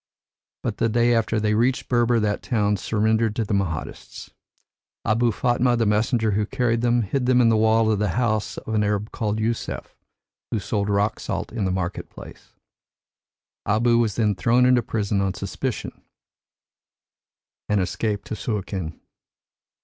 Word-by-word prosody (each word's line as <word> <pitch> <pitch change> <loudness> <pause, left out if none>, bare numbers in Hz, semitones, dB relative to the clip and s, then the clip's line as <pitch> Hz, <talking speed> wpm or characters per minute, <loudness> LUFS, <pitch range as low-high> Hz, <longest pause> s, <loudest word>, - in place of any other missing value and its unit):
But - - -2
the 115 - +1
day 120 +2 +3
after 110 -1 +1
they 105 0 +1
reached 120 +4 +1
Berber, 120 -1 +2
that 105 -1 0
town 105 -4 +1
surrendered 110 +2 +1
to 115 - -1
the 105 - -3
Mahdists. 85 -8 -4 0.7
Abou 115 +2 +2
Fatma, 120 +2 +1
the 115 - +1
messenger 110 +1 +1
who 105 +1 0
carried 120 -3 0
them, 120 -1 +2
hid 125 +5 -1
them 125 -1 +4
in 120 -2 +5
the 115 - +3
wall 110 0 +3
of 105 - 0
the 105 - +1
house 110 -4 0
of 110 - -6
an 105 -1 +2
Arab 105 +1 -1
called 105 -1 -2
Yusef, 115 +1 -3 0.5
who - - -1
sold 100 +1 -2
rock 100 +2 +1
salt - - -4
in 110 -4 -1
the 95 - 0
market 90 -1 -3
place. - - -13 1.1
Abou 115 +3 +3
was 110 -4 +1
then 105 -3 +2
thrown 120 +5 +3
into 125 -1 +4
prison 105 -4 -1
on 95 -1 -1
suspicion, 105 +6 -4 1.7
and 105 -1 +2
escaped 100 +2 -2
to - - -4
Suakin. 95 -7 -4
110 Hz, 160 wpm, -23 LUFS, 105-120 Hz, 1.7 s, in